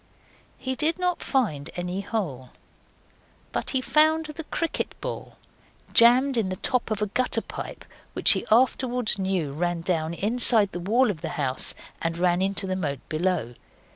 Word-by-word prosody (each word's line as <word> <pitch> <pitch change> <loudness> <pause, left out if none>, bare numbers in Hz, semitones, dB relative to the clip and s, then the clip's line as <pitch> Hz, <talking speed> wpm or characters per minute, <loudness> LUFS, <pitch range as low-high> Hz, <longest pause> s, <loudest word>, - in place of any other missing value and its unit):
He 260 0 -3
did 310 +5 0
not 360 -1 -1
find 165 - -1
any 180 +2 -3
hole, 170 - -4 1.0
but - - -3
he 260 - 0
found 315 +3 +3
the 305 +1 -7
cricket 330 +1 -3
ball - - -6 0.6
jammed 250 +3 +6
in 210 -5 0
the 185 - -3
top 250 +6 -1
of 215 -1 -1
a - - +2
gutter 250 +5 0
pipe - - -8 0.3
which - - +6
he - - +3
afterwards 245 -1 +2
knew 190 -6 -1
ran 175 +2 -2
down 165 -1 -1
inside 220 0 +4
the 175 - -5
wall 225 +6 +2
of 165 -5 -9
the 165 - -4
house 135 -3 0 0.3
and 165 0 -2
ran 175 0 +2
into 195 +1 0
the 185 0 -2
moat 145 -7 -4
below. 160 -7 -1
200 Hz, 165 wpm, -25 LUFS, 175-255 Hz, 1.0 s, jammed